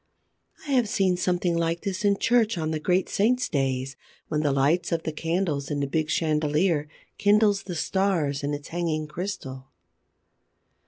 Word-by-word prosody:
I - - -3
have 245 -5 +2
seen 190 -3 +2
something 180 -1 0
like 170 0 0
this 195 -1 -3
in 200 -1 +3
church, 230 -3 +2
on 160 -1 -2
the 155 - -1
great 180 +4 +1
saints' 250 +5 +1
days, 135 -1 -1 0.3
when 150 - 0
the 145 -2 +1
light 140 +7 +1
of 165 -1 0
the 160 - -2
candles 160 -3 -2
in 145 - -2
the 140 - 0
big 155 +2 -1
chandelier 155 0 +1 0.3
kindles 205 -1 +4
the 180 -3 -6
stars 170 -6 0
in 145 +1 -1
its 145 0 -9
hanging 165 -2 -1
crystal. 150 -6 -6
165 Hz, 165 wpm, -26 LUFS, 150-195 Hz, 0.3 s, kindles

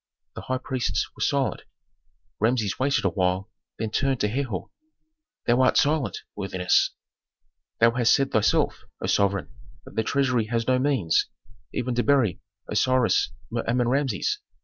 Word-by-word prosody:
The - - -7
high 130 - -2
priests 130 -1 -1
were - - -11
silent; - - 0 0.8
Rameses 110 -2 +1
waited 135 +1 +1
a - - +4
while, 95 0 -1 0.3
then 110 -1 -3
turned 135 +1 0
to 105 - +2
Herhor, 120 -5 -3 0.7
"Thou 120 +2 +3
art 130 - +4
silent, 145 - +2 0.2
worthiness." 95 -3 +1 0.9
"Thou 115 +1 +6
hast 120 -1 +4
said 135 0 0
thyself, 110 -1 +1
O - - -4
sovereign, 100 +3 +1 0.3
that - - -13
the 110 - +2
treasury 125 0 +1
has 115 +1 -2
no 130 0 +3
means, 130 - +2 0.4
even 125 0 -2
to 120 - +1
bury 130 -9 +2 0.3
Osiris 130 -5 +2 0.2
Mer 115 0 -2
Amen 120 0 +1
Rameses. 130 -6 0
120 Hz, 150 wpm, -25 LUFS, 105-130 Hz, 0.9 s, Thou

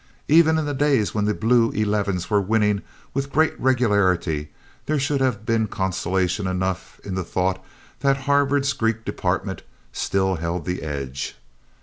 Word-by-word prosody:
Even 160 +1 +5
in 155 - 0
the 145 - -2
days 135 -6 +2
when 105 -1 0
the 105 - +2
blue 115 +1 +3
elevens 100 -4 0
were 105 -2 +2
winning 105 0 +1 0.3
with 140 +1 -2
great 160 +1 +3
regularity 95 - +2 0.4
there 155 - +1
should 140 0 0
have 115 -5 0
been 115 -1 +1
consolation 95 0 -1
enough 95 0 -3
in 100 - -5
the 95 0 -1
thought 95 +2 -1 0.4
that 135 -1 +2
Harvard's 140 0 +2
Greek 110 0 -1
department - - -2 0.3
still 95 -1 0
held 85 +1 -3
the 90 0 -3
edge. 70 -4 -4
105 Hz, 150 wpm, -23 LUFS, 95-135 Hz, 0.4 s, Even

